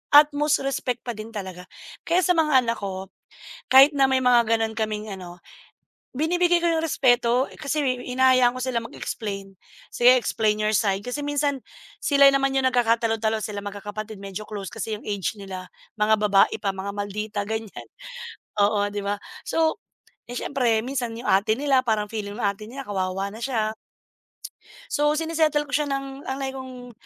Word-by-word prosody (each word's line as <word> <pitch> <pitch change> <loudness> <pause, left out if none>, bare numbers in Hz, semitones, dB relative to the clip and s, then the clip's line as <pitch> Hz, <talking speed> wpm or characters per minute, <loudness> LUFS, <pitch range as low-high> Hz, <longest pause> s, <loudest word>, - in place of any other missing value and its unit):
at 295 +1 +8
most 295 0 +1
respect 255 -3 -2
pa 245 - -3
din 215 -1 -7
talaga. 185 -3 -7 0.4
Kaya 350 +2 +3
sa 360 - +3
mga 305 -3 +3
anak 230 0 -2
ko, 190 -1 -6 0.6
kahit 270 +3 +8
na 275 -1 +5
may 260 - +3
mga 245 -2 +5
gano'n 225 0 0
kaming 215 -1 -2
ano, 180 -3 -8 0.8
binibigay 350 +4 +2
ko - - +3
'yung 325 -1 +1
respeto 250 -4 +3
kasi 300 +1 -1 0.2
hinahayaan 255 -1 +4
ko - - -5
sila 250 -2 0
mag-explain. 200 -4 -6 0.4
"Sige 250 +1 +6
explain 215 -3 0
your 215 0 +1
side," 195 -2 +1
kasi 250 +4 -3
minsan 290 -2 0 0.4
sila 280 -1 +5
naman 275 0 +2
'yung 265 - +2
nagkakatalo-talo 225 -2 +1
silang 205 -1 -5
magkakapatid 205 +1 -7
medyo 195 0 -6
close 200 -3 -6
kasi 220 -1 -4
'yung - - -16
age 205 0 -2
nila 185 -2 -7 0.3
mga 215 +1 +5
babae 200 -2 +4
pa 200 - 0
mga 195 +1 -4
maldita 205 +1 -3
ganiyan. 220 -1 -5 0.8
Oo, 205 0 +3
di 205 - -2
ba, 200 +1 -1 0.3
so, 325 +6 0 0.5
eh, 245 - -6
siyempre 240 -5 +1
minsan 245 -2 -3
'yung 235 - -7
ate 200 +3 +3
nila 275 -2 +3
parang 215 -2 0
feeling 205 -2 -5
ng - - -4
ate 200 +1 -1
nila 270 +4 -7
kawawa 195 0 -2
na - - -9
siya. 220 -5 -1 1.2
So 295 +1 +2
sine-settle 315 -2 +1
ko - - -12
siya, 300 0 +1
ng 275 0 -4
ang 265 - -2
lagi 270 -1 -3
kong 255 -2 -9
230 Hz, 170 wpm, -24 LUFS, 205-275 Hz, 1.2 s, at